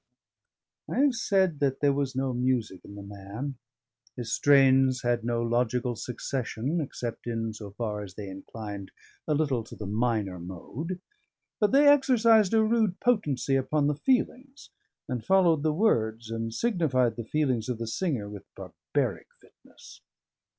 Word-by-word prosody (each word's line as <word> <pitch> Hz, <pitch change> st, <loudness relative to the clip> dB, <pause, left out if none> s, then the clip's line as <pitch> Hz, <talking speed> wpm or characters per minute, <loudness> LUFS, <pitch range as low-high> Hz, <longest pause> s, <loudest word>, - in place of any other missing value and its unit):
I -, -, -3 dB
have 285 Hz, -2 st, +4 dB
said 190 Hz, -8 st, +1 dB
there 140 Hz, 0 st, +2 dB
was 140 Hz, -2 st, -2 dB
no 130 Hz, -1 st, -1 dB
music 125 Hz, -6 st, -1 dB
in 100 Hz, -, -11 dB
the 100 Hz, -, -8 dB
man. 105 Hz, +7 st, -7 dB, 0.6 s
His 120 Hz, -3 st, -4 dB
strains 135 Hz, -2 st, +4 dB
had 120 Hz, -1 st, +1 dB
no 115 Hz, 0 st, 0 dB
logical 120 Hz, +1 st, 0 dB
succession 130 Hz, +5 st, -3 dB
except 120 Hz, -5 st, -5 dB
in 115 Hz, -1 st, -2 dB
so 105 Hz, -1 st, -8 dB
far 105 Hz, 0 st, -4 dB
as 95 Hz, -3 st, -9 dB
they 105 Hz, -2 st, -7 dB
inclined 100 Hz, +1 st, -7 dB, 0.4 s
a 150 Hz, -, +2 dB
little 140 Hz, -6 st, 0 dB
to -, -, -11 dB
the 105 Hz, -, -7 dB
minor 105 Hz, -3 st, -1 dB
mode; 120 Hz, -, -6 dB, 0.6 s
but 210 Hz, -, +3 dB
they 285 Hz, +2 st, +6 dB
exercised 230 Hz, -7 st, +5 dB
a 220 Hz, -, +5 dB
rude 220 Hz, -4 st, +1 dB
potency 145 Hz, -, +1 dB
upon 145 Hz, +2 st, +1 dB
the 150 Hz, -, +2 dB
feelings, 260 Hz, -, -1 dB, 0.4 s
and 125 Hz, -5 st, -3 dB
followed 180 Hz, -5 st, +4 dB
the 155 Hz, +1 st, +2 dB
words, 115 Hz, -, +1 dB
and 115 Hz, 0 st, -3 dB
signified 135 Hz, -, +1 dB
the 115 Hz, -, -5 dB
feelings 130 Hz, -2 st, 0 dB
of 125 Hz, -, -2 dB
the 115 Hz, -, -4 dB
singer 120 Hz, -, -2 dB
with 100 Hz, -1 st, -9 dB
barbaric -, -, -3 dB
fitness. -, -, -18 dB
130 Hz, 150 wpm, -28 LUFS, 110-160 Hz, 0.6 s, they